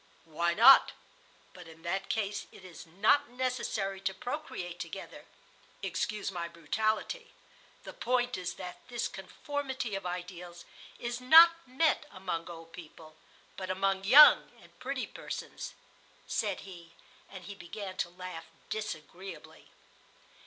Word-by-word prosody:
"Why 170 +2 0
not? 245 +5 +8 0.6
But 180 -2 -12
in 165 0 -15
that 190 +3 -2
case 205 -2 -2
it 185 - -14
is 175 -1 -11
not 205 - +3
necessary 240 -6 -2
to 190 0 -2
procreate 195 - -5
together - - -8 0.6
(excuse 210 -1 -2
my 170 -2 -4
brutality). 215 - -2 0.5
The - - -9
point 245 0 0
is 180 -1 -4
that 180 -1 -8
this 240 -2 -2
conformity 260 +4 -5
of 195 -2 -3
ideals 175 -1 -7 0.3
is 240 +1 -4
not 325 +6 +9 0.2
met 300 +4 +1
among 180 -3 -4
old 165 -1 -11
people, 155 -2 -12 0.4
but 185 -1 -6
among 195 +1 0
young 280 +9 +8
and - - -20
pretty - - -3
persons," - - -7 0.5
said - - -1
he, 170 -3 -12 0.4
and 190 -2 -10
he 200 - -8
began 195 +1 -7
to 175 - -1
laugh 180 -2 -8 0.3
disagreeably. 190 -2 -7
195 Hz, 130 wpm, -31 LUFS, 175-240 Hz, 0.6 s, not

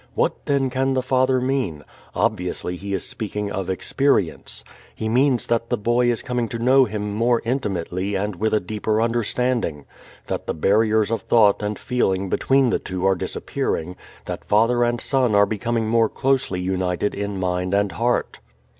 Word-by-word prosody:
What - - -1
then 135 -2 +1
can 135 +1 0
the 130 - 0
father 130 0 +2
mean? 125 - -1 0.3
Obviously 90 0 -1
he 100 +3 -7
is 95 - -4
speaking 105 -1 -4
of 95 -1 -3
experience. 95 - 0 0.3
He 110 - -3
means 125 +2 +2
that 115 0 -1
the 120 - +1
boy 120 +3 +2
is 115 - -3
coming 125 -2 -1
to 115 - -4
know 130 +3 +5
him 105 -2 -4
more 115 +2 +2
intimately 100 -5 -2
and 100 +1 -2
with 110 -1 0
deeper 110 +1 -1
understanding, 115 - 0 0.4
that - - -4
the - - -2
barriers 110 +5 +2
of 115 -3 -1
thought 105 -4 +4
and 105 0 -2
feeling 95 -6 0
between 135 +4 +2
the - - +1
two 90 0 -4
are 95 - +5
disappearing, 90 -1 -3 0.3
that - - -5
father 115 +3 +3
and 120 0 0
son 125 -6 +1
are 100 0 +6
becoming 110 +2 -1
more 115 0 +3
closely 130 -9 0
united 90 +1 -1
in 100 -1 -4
mind 90 +1 -1
and 100 -1 +1
heart. 120 +6 -1
110 Hz, 170 wpm, -22 LUFS, 95-125 Hz, 0.4 s, are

